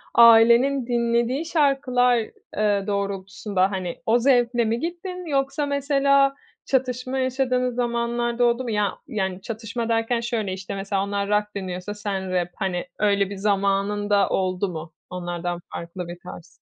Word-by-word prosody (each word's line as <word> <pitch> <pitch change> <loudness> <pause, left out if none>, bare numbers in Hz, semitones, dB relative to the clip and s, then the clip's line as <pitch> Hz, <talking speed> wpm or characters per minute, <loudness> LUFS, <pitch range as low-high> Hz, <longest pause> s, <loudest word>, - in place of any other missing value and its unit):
ailenin 235 +3 +6
dinlediği 240 +4 +1
şarkılar, 270 -6 +2 0.4
eee, 205 -2 +2
doğrultusunda, 200 -1 -1
hani, 185 -3 -4
o 230 +2 +4
zevkle 245 -2 +3
mi 225 +2 0
gittin, 355 +3 -5
yoksa, 275 -1 0
mesela, 280 -1 +3 0.3
çatışma 255 0 -1
yaşadığın 255 -1 +1
zamanlar 240 0 -1
da - - +4
oldu 240 +1 +2
mu? 240 - -3
Ya, 210 -2 +1 0.2
yani, 190 -7 -2
çatışma 230 +2 -4
derken 230 +1 +1
şöyle; 230 -5 -2
işte, 190 +1 -6
mesela 195 0 -1
onlar 200 0 -2
rock 210 0 0
dinliyorsa 185 0 -4
sen 195 -3 -4
rap, 180 -1 0
hani, 180 -3 -2
öyle 200 -2 +2
bir 200 - -5
zamanın 200 +1 0
da 200 -1 +3
oldu 185 +1 0
mu? 160 -2 -7 0.2
Onlardan 175 -1 -4
farklı 170 +1 -6
bir 175 0 -7
tarz. 180 -2 -10
225 Hz, 150 wpm, -24 LUFS, 195-250 Hz, 0.4 s, ailenin